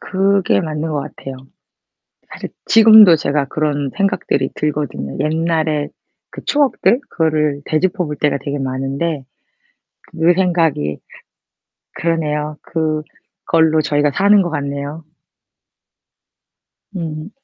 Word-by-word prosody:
그게 195 0 +1
맞는 155 -1 -3
것 150 -2 -2
같아요. 135 -1 -8 0.9
사실 - - -8 0.2
지금도 220 -5 +8
제가 145 -2 -1
그런 145 -2 -2
생각들이 195 -9 0
들거든요. 145 - -3
옛날에 160 -1 0 0.4
그 - - -10
추억들 280 -3 +2
그거를 150 -3 0
되짚어 180 +3 0
볼 150 0 -5
때가 145 -1 0
되게 145 +1 -4
많은데 135 +3 -3 0.9
그 165 +1 +3
생각이 165 - 0 1.0
그러네요. 150 -2 -2
그걸로 160 0 -1
저희가 145 0 +1
사는 200 +6 +4
것 175 - -1
같네요. 145 +1 -4 1.9
음. 160 -1 -5
155 Hz, 230 characters per minute, -17 LUFS, 145-170 Hz, 1.9 s, 지금도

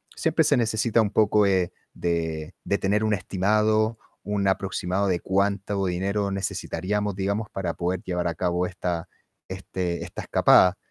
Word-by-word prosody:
siempre 160 0 +2
se 145 -3 +3
necesita 115 0 +2
un 105 - +1
poco, 105 -1 +4
eh, 95 -2 +1 0.2
de 80 -2 -2
de 100 - 0
tener 105 +3 +1
un 110 - +2
estimado, 110 +4 +1 0.3
un 100 -1 -1
aproximado 95 0 0
de 90 -2 +1
cuánto 100 0 0
dinero 100 +3 -1
necesitaríamos, 100 +1 -2
digamos, 100 +2 -2
para 95 -2 -3
poder 90 +1 -2
llevar 90 -1 -2
a 85 - -2
cabo 90 0 0
esta 90 -2 -3 0.4
este 90 -2 -4
esta - - -7
escapada. 90 +1 +5
95 Hz, 150 wpm, -25 LUFS, 90-105 Hz, 0.4 s, escapada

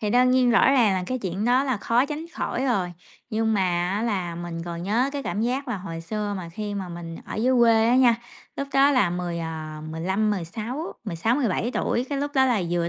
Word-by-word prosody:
Thì 210 -1 -1
đương 250 +1 +4
nhiên 255 -1 +4
rõ 235 - +5
ràng 235 -7 +4
là 185 - -1
cái 255 +4 -2
chuyện 195 0 -3
đó 250 +3 +3
là 260 -4 0
khó 235 +5 +2
tránh 310 +3 -5
khỏi 260 - -2
rồi, 190 -9 0 0.4
nhưng 220 0 +1
mà 195 - +2 0.3
á 205 +3 -1
là, 185 -7 -1
mình 170 -1 -5
còn 170 0 -5
nhớ 235 +8 +1
cái 280 -1 -3
cảm 210 - -2
giác 255 +4 -1
là 230 - -1
hồi 165 -3 -6
xưa 205 +4 -3
mà 175 -3 -6
khi 205 +4 -5
mà 190 -3 -4
mình 170 -1 -7
ở - - -7
dưới 250 +4 +2
quê 225 -1 +5
á 250 - +4
nha, 245 -3 +6 0.4
lúc 275 0 -3
đó 275 +1 +5
là 255 -10 +3
10, 175 -1 -3
à, 155 -2 -5
15-16, 205 - -2
16-17 225 - 0
tuổi, 245 - 0
cái 280 -1 -2
lúc 285 +1 -2
đó 265 -1 +5
là 235 -7 +2
vừa 170 -1 0
215 Hz, 230 wpm, -25 LUFS, 175-250 Hz, 0.4 s, nha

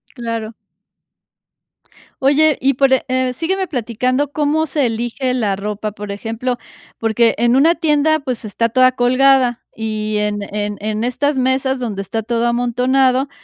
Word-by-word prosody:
Claro. 230 -2 -4 1.7
Oye, 290 +2 +4
y 270 +2 +2
por, 270 +1 +2
e 265 - +2
eh 255 -1 0
sígueme 375 +8 -1
platicando 255 +1 -1
cómo 305 +1 +1
se 285 -2 0
elige 240 +3 -2
la 215 -6 0
ropa, 210 +1 -4
por 210 -1 -7
ejemplo, 225 +4 -3 0.4
porque 225 +1 +2
en 240 +2 +3
una 320 +6 +4
tienda, 315 -1 +2
pues, 255 -5 -4
está 220 +2 -1
toda 255 +2 +4
colgada, 255 0 +3
y 215 -1 -3
en 210 0 -1
en 210 0 -2
en 215 +2 -2
estas 285 +3 0
mesas 260 +1 0
donde 215 -6 -3
está 200 +3 -3
todo 235 +1 -1
amontonado, 255 +3 +1
250 Hz, 145 wpm, -18 LUFS, 225-270 Hz, 1.7 s, Oye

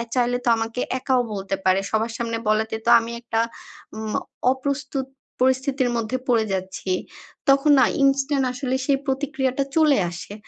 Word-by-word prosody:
চাইলে 245 -1 +1
তো - - 0
আমাকে 225 +2 -3 0.2
একাও 255 -1 +1
বলতে 195 0 -3
পারে। 190 +1 +4
সবার 225 +1 0
সামনে 230 -1 -2
বলাতে 220 +1 +1
তো - - +4
আমি 230 +1 -6
একটা 225 -1 -1 0.6
উম 220 -1 -4 0.4
অপ্রস্তুত 270 0 -3 0.4
পরিস্থিতির 260 0 +2
মধ্যে 230 +2 -1
পড়ে 230 -3 +3
যাচ্ছি। 190 0 -4 0.6
তখন 275 +2 +5
না 260 - +7 0.2
ইনস্টান্ট 275 0 +2
আসলে 255 0 -2
সেই 275 -2 +3
প্রতিক্রিয়াটা 270 -1 -1
চলে 305 -5 +5
আসে। 175 +3 -8
250 Hz, 150 wpm, -23 LUFS, 225-270 Hz, 0.6 s, না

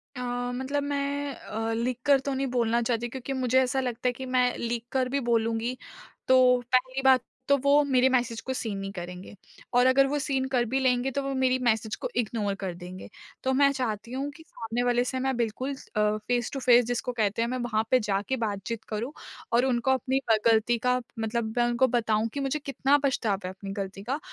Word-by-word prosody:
अ, - - -6 0.4
मतलब 275 +3 -2
मैं 285 0 -2
अ, 225 +1 -4
लिख 235 +2 -1
कर 280 -2 +5
तो 275 +1 -3
नहीं 270 +1 -1
बोलना 235 0 +2
चाहती 235 0 -1
क्योंकि 265 +2 -5
मुझे 260 0 +2
ऐसा 260 +1 0
लगता 250 -1 -2
है 250 - +2
कि 260 +2 -7
मैं 250 -1 +2
लिख 235 0 -2
कर 260 -1 0
भी 280 +2 0
बोलूँगी 230 +2 0 0.5
तो 255 -1 +5
पहली 255 +1 +1
बात 265 -2 +5 0.3
तो 280 - +5
वो 285 +1 +5
मेरे 260 -1 +4
मैसेज 240 -3 0
को 260 - 0
सीन 220 -5 -3
नहीं 195 0 -5
करेंगे। 180 -1 -8 0.4
और 245 +1 +5
अगर 270 +1 +5
वो 290 +2 -1
सीन 270 -2 -1
कर 245 -2 +3
भी 265 - +2
लेंगे 255 0 +1
तो 280 - -1
वो 275 0 -2
मेरी 260 -1 +2
मैसेज 220 -2 +1
को - - -5
इग्नोर 210 -3 -1
कर 185 -2 -2
देंगे। 180 +1 -9 0.3
तो 265 - +1
मैं 280 +1 +4
चाहती 235 -4 -3
हूँ 270 +3 -3
कि 320 +3 -15
सामने 235 -7 -4
वाले 245 0 +2
से 260 +1 -3
ना 265 +1 0
बिल्कुल 240 +3 -2 0.2
अ, 210 0 +2
फेस 245 -2 0
टू 275 - -2
फेस 245 -2 +5
जिसको 245 +1 -2
कहते 220 -2 0
हैं 235 - 0
मैं 255 - -2
वहाँ 230 -3 0
पे 255 - +6
जाके 210 +2 -1
बातचीत 220 0 -3
करूँ। 225 +5 -3 0.4
और 240 +2 +3
उनको 255 0 +1
अपनी 265 0 +1
अ, 225 - +6
गलती 225 +1 +3
का 250 0 +3 0.2
मतलब 220 0 -2
मैं 240 - +4
उनको 240 +2 +3
बताऊँ 225 -2 +1
कि 285 - -3
मुझे 275 +2 -1
कितना 275 0 +2
पछतावा 225 -8 0
है - - -3
अपनी 195 +1 -8
गलती 195 -1 -5
का 265 +7 -2
245 Hz, 215 wpm, -27 LUFS, 225-265 Hz, 0.5 s, पे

